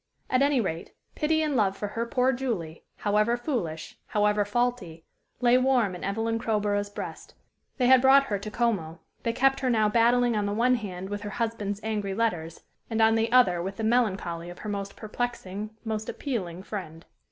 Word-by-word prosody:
At 255 - +3
any 280 -1 +3
rate, 170 -6 -3 0.2
pity 315 0 +1
and 300 -2 0
love 200 -4 +2
for 205 - -3
her 230 +3 -3
poor 255 +2 +2
Julie 215 -11 -4
however 210 +3 +1
foolish, 205 - -4
however 210 0 +2
faulty 205 -7 -2 0.4
lay 245 +1 +5
warm 255 -7 +2
in 180 - -8
Evelyn 225 +3 -1
Crowborough's 205 -2 0
breast; 205 - -8 0.4
they 255 - +2
had 260 0 +7
brought 270 +1 +7
her 205 -7 -2
to 215 +2 -6
Como; 205 -9 -1 0.2
they 230 - 0
kept 270 +3 +2
her 260 - 0
now 220 -3 +3
battling 235 +2 +3
on 205 -1 0
the 205 - -1
one 245 +3 +3
hand 190 -5 -4
with 205 0 -3
her 205 - -5
husband's 210 -3 -2
angry 210 -3 -2
letters 175 -8 -2 0.3
and 225 -1 -1
on 225 0 +5
the 225 +1 +1
other 210 -9 +5
with 190 +2 -4
the 225 - -4
melancholy 195 -7 0
of 175 - -9
her 215 - -6
most 200 -1 -4
perplexing, 215 -3 -4 0.2
most 220 -1 -3
appealing 185 - -4
friend. 175 -5 -7
215 Hz, 185 wpm, -27 LUFS, 195-245 Hz, 0.4 s, had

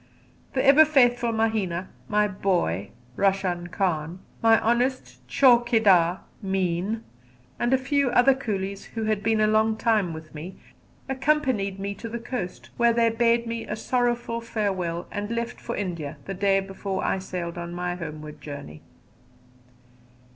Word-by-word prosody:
The 260 - +1
ever 280 +3 +8
faithful 245 -6 +3
Mahina, 215 -6 -1 0.2
my 210 0 +3
"boy" 175 - -1 0.3
Roshan 190 -3 0
Khan, 175 -3 -1 0.2
my 225 -1 +5
honest 240 - 0
chaukidar, 220 - +4 0.2
Meeanh, 190 +3 -1 0.6
and 240 - +1
a 265 - +5
few 275 +1 +1
other 250 +3 +5
coolies 200 -6 -4
who 225 - -2
had 215 -2 0
been 220 +1 +1
a 215 - +4
long 220 +1 +2
time 220 -6 +2
with 160 -1 -9
me, 160 +5 -8 0.5
accompanied 260 -8 0
me 200 +1 -3
to 230 +3 -8
the 235 - -4
coast, 230 -6 -6
where 235 -1 +4
they 230 0 +3
bade 235 +1 +2
me 230 0 -4
a 210 - -3
sorrowful 240 0 -1
farewell 190 -7 -2
and 205 0 -4
left 235 0 -3
for 235 - -4
India 170 -7 -4
the 195 - -4
day 195 +1 +2
before 195 0 -4
I 190 - 0
sailed 175 -2 -5
on 170 0 -5
my 175 0 -3
homeward 155 -3 -8
journey. 140 - -8
205 Hz, 145 wpm, -25 LUFS, 180-235 Hz, 0.6 s, ever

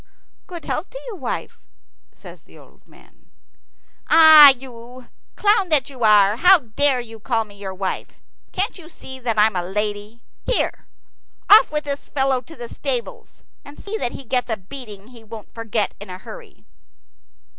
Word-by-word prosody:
"Good 345 -4 -9
health 325 - -4
to - - -9
you, 475 -4 -7
wife," - - -6 0.5
says - - -14
the - - -20
old - - -21
man. - - -23 0.8
"Ah, 315 -3 +9
you, 250 -1 -6 0.3
clown 410 -3 +2
that 285 -3 +1
you 255 -3 -7
are, 210 -1 +4
how 365 +6 +6
dare 270 0 0
you 225 -2 -9
call 225 +1 -1
me 205 - -17
your 195 -2 -8
wife! 190 0 -4 0.4
Can't 390 +2 -3
you 325 -2 -13
see 265 -5 -10
that 235 -3 -3
I'm 210 -1 +3
a 180 - 0
lady? 210 +4 -5 0.2
Here! - - -2 0.6
Off 420 -5 +7
with 300 0 -2
this 285 -1 -6
fellow 265 -2 0
to 325 +6 -14
the 240 - -8
stables, 255 -1 -6 0.2
and 285 +1 -14
see 410 +2 -6
that 240 - -4
he - - -8
gets 250 0 -2
a 220 - -1
beating 210 0 -11
he 235 -3 -15
won't 220 -1 -12
forget 225 -2 -2
in 205 -1 -11
a 180 - -7
hurry." 475 - -13
250 Hz, 170 wpm, -20 LUFS, 215-300 Hz, 0.8 s, Ah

